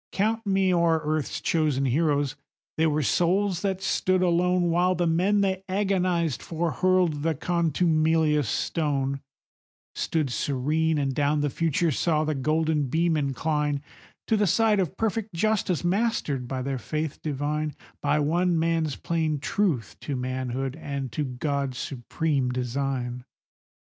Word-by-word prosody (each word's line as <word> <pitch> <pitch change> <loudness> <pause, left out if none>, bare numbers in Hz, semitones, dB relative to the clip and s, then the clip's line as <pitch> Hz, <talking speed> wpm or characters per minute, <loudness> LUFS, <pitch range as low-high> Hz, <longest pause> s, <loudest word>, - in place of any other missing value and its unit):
Count 220 +3 0
me 190 -1 +3
o'er 170 -2 +3
earth's 155 -2 -1
chosen 150 -5 +1
heroes,—they 145 +2 -1
were 150 -1 +1
souls 180 +4 +1
that 195 -1 -2
stood 185 -1 +1
alone, 175 0 +2
While 180 +2 +2
the 175 0 0
men 185 +5 +2
they 190 -1 0
agonized 185 - 0
for 165 0 -2
hurled 185 -5 +2
the 160 +1 0
contumelious 160 -3 +2
stone, 140 -3 -1 0.7
Stood 155 -5 -1
serene, 150 +5 0
and 135 -2 0
down 145 +2 +1
the 145 -1 0
future 165 +1 +1
saw 155 +2 +1
the 155 0 0
golden 155 +1 +1
beam 165 +5 +1
incline 150 0 -1 0.4
To 220 - +2
the 210 -1 +2
side 215 +3 +3
of 185 0 -1
perfect 220 -2 -2
justice, 190 -2 +1
mastered 175 - 0
by 130 0 -3
their 135 -1 -2
faith 155 +4 -4
divine, 150 +1 -2 0.3
By 145 +1 +2
one 170 +4 +2
man's 160 -2 0
plain 160 -3 -1
truth 145 - -1
to 145 - -3
manhood 130 +1 -3
and 140 -5 -4
to 150 +6 -2
God's 140 0 -2
supreme 135 +2 -1
design. 125 0 -2
155 Hz, 140 wpm, -26 LUFS, 140-175 Hz, 0.7 s, me